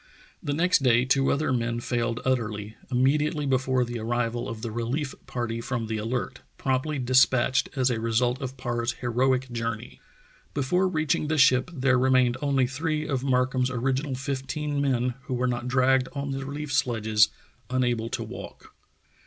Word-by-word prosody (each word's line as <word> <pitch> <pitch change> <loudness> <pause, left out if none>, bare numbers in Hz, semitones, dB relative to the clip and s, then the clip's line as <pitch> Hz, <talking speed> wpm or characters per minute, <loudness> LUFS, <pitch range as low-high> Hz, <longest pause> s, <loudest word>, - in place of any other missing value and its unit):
The 145 - -2
next 180 0 +3
day 125 -2 +4
two 135 +1 +2
other 140 -2 +1
men 120 -1 -1
failed 120 0 -1
utterly, 110 -4 -1
immediately 145 +4 +1
before 130 -1 +1
the 120 0 -5
arrival 120 +1 -1
of 115 0 -7
the 115 - -3
relief 125 +6 -2
party 115 -2 -3
from 120 -2 -3
the 110 0 -3
Alert 125 +4 -3
— - - -40
promptly 135 +3 -1
despatched 130 0 +3
as 130 -2 +2
a 115 - -1
result 120 +3 +1
of 130 0 -5
Parr's 120 -1 -2
heroic 125 +2 0
journey. 115 0 -4 0.6
Before 180 +7 +2
reaching 155 -3 0
the 155 +1 0
ship 130 +1 +5
there 130 -5 +2
remained 130 -1 +3
only 140 -3 +2
three 155 +4 -2
of 135 -3 -1
Mark 130 -1 +2
ham's 130 -1 +1
original 130 +3 -1
fifteen 140 +2 -3
men 125 -3 +1
who 130 - -2
were 125 +1 0
not 120 0 -1
dragged 130 0 +3
on 140 -1 -3
the 135 0 -3
relief 145 0 -5
sledges, 110 -4 +3 0.4
unable 120 -3 0
to - - -3
walk. - - -10
130 Hz, 170 wpm, -26 LUFS, 120-135 Hz, 0.6 s, ship